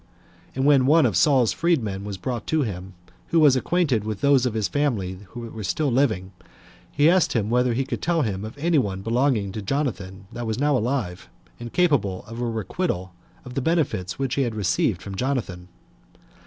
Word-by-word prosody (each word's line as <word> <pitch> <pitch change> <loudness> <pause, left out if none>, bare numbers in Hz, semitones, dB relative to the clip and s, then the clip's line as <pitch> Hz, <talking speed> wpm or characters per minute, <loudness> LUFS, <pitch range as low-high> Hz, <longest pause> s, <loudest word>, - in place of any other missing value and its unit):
And 135 +1 0
when 140 -3 +5
one 155 +1 +5
of 110 -7 +1
Saul's 130 - +4
freed 170 -6 +1
men 100 -2 -4
was 100 -1 -5
brought 120 +5 -4
to 160 -2 +1
him, 95 -4 -6 0.3
who 170 - +2
was 145 -4 +6
acquainted 140 - +1
with 105 -2 -4
those 140 -3 +4
of 115 - -4
his 110 -3 0
family 110 -6 -1 0.2
that 115 -1 -7
were 110 - -6
still 130 +10 0
living, 110 -8 +1 0.6
he 145 +1 +3
asked 180 +1 +3
him 110 -2 0
whether 125 -1 +2
he 135 +2 0
could - - -4
tell 170 -2 +1
him 100 -4 -3
of 110 +5 -8
any 160 +1 +2
one 95 -5 -3
belonging 115 -3 +1
to 105 - -5
Jonathan 100 - -3
that 120 0 -5
was 110 0 -2
now 145 +1 +2
alive, 115 -7 -2 0.3
and 120 -1 -7
capable 130 - +1
of 115 +2 -7
a - - 0
requital 110 - -3 0.3
of 125 - -8
the 135 - -1
benefits 140 - 0
which 135 -2 -2
he 140 - +1
had 120 -4 -1
received 95 -1 0
from 100 - -7
Jonathan. 95 -7 -3
120 Hz, 200 wpm, -24 LUFS, 100-140 Hz, 0.6 s, was